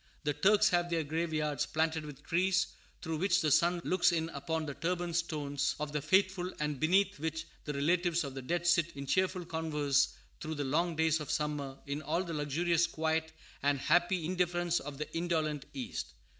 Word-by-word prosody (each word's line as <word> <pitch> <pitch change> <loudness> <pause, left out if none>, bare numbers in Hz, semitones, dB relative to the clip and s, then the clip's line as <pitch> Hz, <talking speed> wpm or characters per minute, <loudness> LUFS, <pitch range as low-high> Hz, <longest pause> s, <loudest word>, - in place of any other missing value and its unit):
The 145 -1 +1
Turks 205 +6 +4
have 175 -1 +1
their 165 -2 0
graveyards 155 -1 -1
planted 160 -1 0
with 145 0 -10
trees, 185 +2 +2 0.4
through 160 -2 -2
which 185 +1 +3
the 155 -2 +1
sun 175 +4 +4
looks 185 0 +3
in 165 -1 0
upon 160 +2 -3
the 145 - -4
turban 175 +2 -2
stones 150 -4 -1
of 150 -1 -3
the 150 -1 -1
faithful, 185 +3 +2
and 150 -2 -2
beneath 195 +5 +2
which 160 +1 -3 0.2
the 150 - -3
relatives 170 +4 +1
of 140 -2 -5
the 135 - -5
dead 170 +6 -2
sit 170 -1 +3
in 140 0 -5
cheerful 185 +3 +1
converse 150 -4 +1 0.2
through 155 0 -4
the 145 - -2
long 165 +5 +1
days 160 0 +2
of 150 - -6
summer, 145 -3 -2
in 145 +1 -3
all 170 +5 0
the 170 -2 -5
luxurious 165 +3 +1
quiet 160 -1 -1 0.3
and 145 0 +2
happy 175 +4 +2
indifference 175 -1 +1
of 140 0 -7
the 150 - -4
indolent 160 -4 -1
East. 125 - -5
160 Hz, 185 wpm, -32 LUFS, 150-175 Hz, 0.4 s, Turks